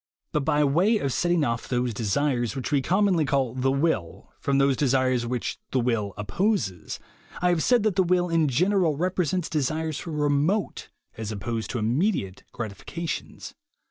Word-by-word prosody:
But -, -, +1 dB
by 150 Hz, 0 st, +2 dB
way 175 Hz, +11 st, +3 dB
of 140 Hz, -10 st, -1 dB
setting 175 Hz, -2 st, +2 dB
off 115 Hz, -3 st, -2 dB
those 125 Hz, -1 st, 0 dB
desires 120 Hz, +2 st, 0 dB
which 135 Hz, +1 st, -4 dB
we 145 Hz, -2 st, +3 dB
commonly 185 Hz, +2 st, +2 dB
call 135 Hz, -3 st, 0 dB
"the 130 Hz, +1 st, 0 dB
will" 135 Hz, -, -1 dB
from 140 Hz, -1 st, +1 dB
those 135 Hz, -1 st, +3 dB
desires 130 Hz, -3 st, +1 dB
which 125 Hz, -1 st, -3 dB
"the 130 Hz, -, +1 dB
will" 115 Hz, -5 st, -1 dB
opposes, 105 Hz, -, -1 dB, 0.4 s
I 180 Hz, -, +2 dB
have 175 Hz, -2 st, +2 dB
said 245 Hz, +2 st, +3 dB
that 210 Hz, -4 st, +1 dB
the -, -, +6 dB
will, 180 Hz, 0 st, +2 dB
in 165 Hz, -2 st, +2 dB
general, 175 Hz, +2 st, +2 dB
represents 180 Hz, 0 st, 0 dB
desires 155 Hz, +1 st, -1 dB
for -, -, -7 dB
remote, 150 Hz, +6 st, 0 dB, 0.3 s
as 110 Hz, -1 st, -4 dB
opposed 110 Hz, +2 st, -3 dB
to -, -, -2 dB
immediate, 115 Hz, -, 0 dB
gratifications. 120 Hz, -, -6 dB
140 Hz, 165 wpm, -25 LUFS, 120-175 Hz, 0.4 s, the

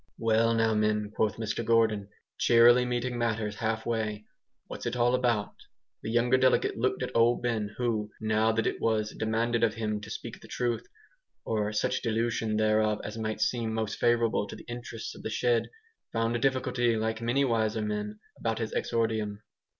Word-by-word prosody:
"Well 115 Hz, 0 st, +2 dB
now, 115 Hz, -1 st, +2 dB
men," 105 Hz, -1 st, +1 dB
quoth 110 Hz, -2 st, +1 dB
Mr 110 Hz, +1 st, -3 dB
Gordon, 110 Hz, -3 st, +2 dB, 0.3 s
cheerily 120 Hz, +1 st, +6 dB
meeting 125 Hz, 0 st, -2 dB
matters 110 Hz, -3 st, -1 dB
half 110 Hz, 0 st, -2 dB
way, 110 Hz, -2 st, -2 dB, 0.4 s
"what's -, -, -6 dB
it -, -, -2 dB
all 120 Hz, 0 st, +3 dB
about?" 120 Hz, -5 st, +1 dB, 0.5 s
The -, -, -5 dB
younger 120 Hz, +2 st, +3 dB
delegate 130 Hz, 0 st, +3 dB
looked 130 Hz, +2 st, 0 dB
at 125 Hz, -, -5 dB
Old 120 Hz, +1 st, +3 dB
Ben, 110 Hz, -4 st, -1 dB
who, 110 Hz, -4 st, -1 dB
now 110 Hz, 0 st, +2 dB
that 115 Hz, 0 st, 0 dB
it -, -, -2 dB
"was 110 Hz, -1 st, +1 dB
demanded 115 Hz, +2 st, 0 dB
of 110 Hz, -2 st, +2 dB
him 105 Hz, -2 st, -2 dB
to 110 Hz, -, -9 dB
speak -, -, -7 dB
the -, -, -13 dB
truth," 120 Hz, -2 st, -2 dB, 0.6 s
or 105 Hz, -1 st, 0 dB
such 105 Hz, -, 0 dB
dilution 115 Hz, -1 st, 0 dB
thereof 110 Hz, 0 st, +2 dB
as 105 Hz, -, -6 dB
might 110 Hz, 0 st, -3 dB
seem 115 Hz, -1 st, 0 dB
most 110 Hz, -2 st, -2 dB
favourable 115 Hz, -3 st, +2 dB
to -, -, -8 dB
the -, -, -11 dB
interests 120 Hz, -1 st, -6 dB
of -, -, -11 dB
the -, -, -4 dB
shed, 120 Hz, +1 st, +1 dB, 0.4 s
found 115 Hz, +1 st, 0 dB
a -, -, 0 dB
difficulty 130 Hz, -3 st, +1 dB
like 110 Hz, +1 st, -2 dB
many 125 Hz, +4 st, +2 dB
wiser 110 Hz, -3 st, 0 dB
men 105 Hz, 0 st, -3 dB, 0.2 s
about 115 Hz, -1 st, -1 dB
his 110 Hz, -2 st, -3 dB
exordium. 110 Hz, -2 st, -1 dB
115 Hz, 180 wpm, -29 LUFS, 110-120 Hz, 0.6 s, cheerily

